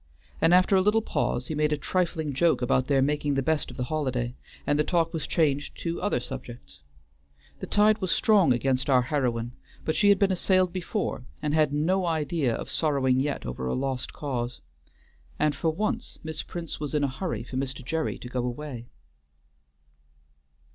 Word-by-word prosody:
And 165 - +5
after 185 +2 +5
a 190 - +5
little 210 +3 +3
pause 125 - -1
he 155 - -4
made 150 0 +1
a 150 - +1
trifling 160 -2 -1
joke 160 0 +2
about 130 +1 +2
their 135 -2 +3
making 145 0 0
the 135 - +1
best 160 +2 0
of - - -10
the 125 - -1
holiday, 125 -4 -2 0.3
and 145 0 +1
the - - +4
talk 165 0 +1
was 160 -3 -3
changed 145 -4 0
to 170 0 -3
other 205 -8 +1
subjects. 120 - -8 0.8
The - - -6
tide 210 +1 +4
was 185 -4 -1
strong 195 -3 +4
against 130 +2 +1
our 130 -2 +5
heroine, 120 -4 -1 0.3
but 155 - 0
she 205 - +4
had 200 - +6
been 195 0 +3
assailed 185 -1 +2
before, 185 - -3
and 150 -1 -1
had 155 -2 +3
no 175 +5 +1
idea 155 -4 0
of - - -5
sorrowing 135 -5 +1
yet 140 +1 -2
over 65 +1 -4
a - - 0
lost 130 -1 -2
cause. 125 -4 -4 0.8
And 150 -1 +1
for 165 - 0
once 215 +8 -2
Miss 160 0 -4
Prince 170 -3 -6
was 150 0 -3
in 150 - +2
a - - +3
hurry 140 +2 -4
for 130 +1 -6
Mr. 135 -1 -3
Gerry 160 +3 -1
to - - -9
go 125 0 -2
away. 125 -1 -5
150 Hz, 190 wpm, -27 LUFS, 130-170 Hz, 0.8 s, had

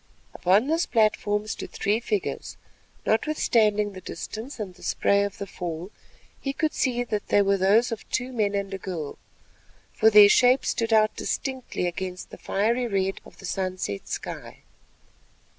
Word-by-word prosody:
Upon 190 +6 +3
this 325 +4 +1
platform 215 -2 +1
stood 215 - -5
three 205 +3 0
figures; 215 -4 -3 0.5
notwithstanding 215 -5 +2
the 185 - -9
distance 220 - -7
and 200 -4 -5
the 180 - -20
spray 200 +3 +2
of 200 -1 -4
the 200 - -5
fall, 175 0 -6 0.5
he 275 - -3
could 310 +2 -1
see 245 -2 0
that 215 -3 -3
they 205 - +4
were 200 0 +2
those 205 +6 +3
of 225 - -6
two 255 0 -2
men 205 -4 0
and 200 -1 -2
a 195 - -4
girl, 170 -6 -5 0.7
for 220 - +5
their 210 -1 +9
shapes 250 +5 +4
stood 230 -1 -1
out 215 -1 +4
distinctly 260 -8 -3
against 180 +1 -5
the - - -10
fiery 235 +5 0
red 195 -2 -1
of - - -16
the 195 - -11
sunset 185 - -3
sky. - - -6
210 Hz, 160 wpm, -25 LUFS, 195-235 Hz, 0.7 s, their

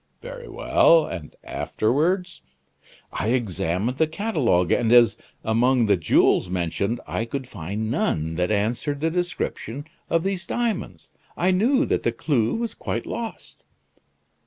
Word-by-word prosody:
"Very - - -9
well! 165 -1 +4
and 80 -5 -7
afterwards?" 170 - -1 0.7
"I - - -2
examined 110 -1 -1
the 160 - +4
catalogue; 150 - +1
and 115 -2 +2
as, 120 -2 +6 0.3
among 120 +2 +3
the 100 -2 +4
jewels 90 +1 +3
mentioned, 95 +6 -1
I 115 - -2
could 130 +2 -5
find 105 +2 -4
none 80 - 0
that 90 +2 0
answered 115 +7 -1
the 160 +2 0
description 160 -6 -3 0.2
of 165 0 +2
these 190 -2 -2
diamonds, 230 -5 -3 0.3
I 180 +2 +2
knew 255 +10 +3
that - - 0
the 115 - +1
clue 115 -2 0
was 230 0 -3
quite - - -4
lost." 230 -1 -6
125 Hz, 135 wpm, -24 LUFS, 105-175 Hz, 0.7 s, as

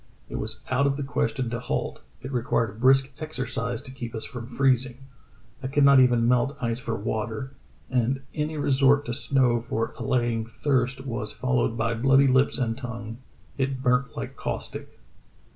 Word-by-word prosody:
It - - -4
was - - -4
out 135 +2 +3
of 140 0 0
the 145 - -2
question 120 -3 -1
to 120 - -2
halt; 125 - -3 0.2
it 130 - -5
required 115 -3 0
brisk 135 +1 +5
exercise 125 -6 -3
to 130 - -10
keep 120 -3 -7
us 110 - -4
from 120 -3 -7
freezing. 130 0 +1 0.6
I 130 - -3
could 145 +2 +2
not 140 -1 +8
even 120 -2 +4
melt 125 +3 +2
ice 115 -1 -1
for 115 -3 -3
water, 110 +5 -3 0.4
and 130 +1 0
any 150 +1 -2
resort 140 0 +3
to 120 - -3
snow 130 -2 +2
for 115 -2 -2
allaying 120 -3 0
thirst 130 +3 -1
was 115 -5 -4
followed 125 -2 0
by 115 0 0
bloody 135 +4 +4
lips 130 +1 +3
and 115 -4 0
tongue; 115 -2 -7 0.4
it 130 -1 -1
burnt 125 +1 +1
like - - -5
caustic. - - -6
125 Hz, 170 wpm, -26 LUFS, 115-135 Hz, 0.6 s, not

